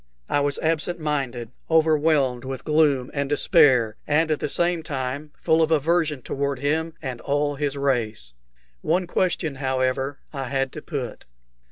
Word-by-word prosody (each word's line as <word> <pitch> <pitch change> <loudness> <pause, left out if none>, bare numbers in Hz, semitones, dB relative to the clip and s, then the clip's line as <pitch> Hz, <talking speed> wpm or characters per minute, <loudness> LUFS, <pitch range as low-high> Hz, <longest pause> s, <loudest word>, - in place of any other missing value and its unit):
I - - +1
was 145 0 +1
absent 165 +2 0
minded, 135 -6 -2 0.2
overwhelmed 155 -5 +3
with 130 0 -6
gloom 150 -5 +2
and 140 -1 -1
despair, 135 - +4
and 160 +2 +2
at 155 - +1
the - - -2
same 175 +1 +1
time 140 0 -4
full 160 -1 +3
of 160 - +3
aversion 160 -3 +1
toward 140 0 -2
him 160 +4 -1
and 130 -4 -5
all 145 0 0
his 145 0 -2
race. 115 - -1 0.5
One 180 +1 +1
question, 170 -5 -1
however, 130 +1 -1 0.2
I 135 -2 -3
had 135 0 -1
to - - -8
put. - - -5
145 Hz, 155 wpm, -24 LUFS, 130-160 Hz, 0.5 s, despair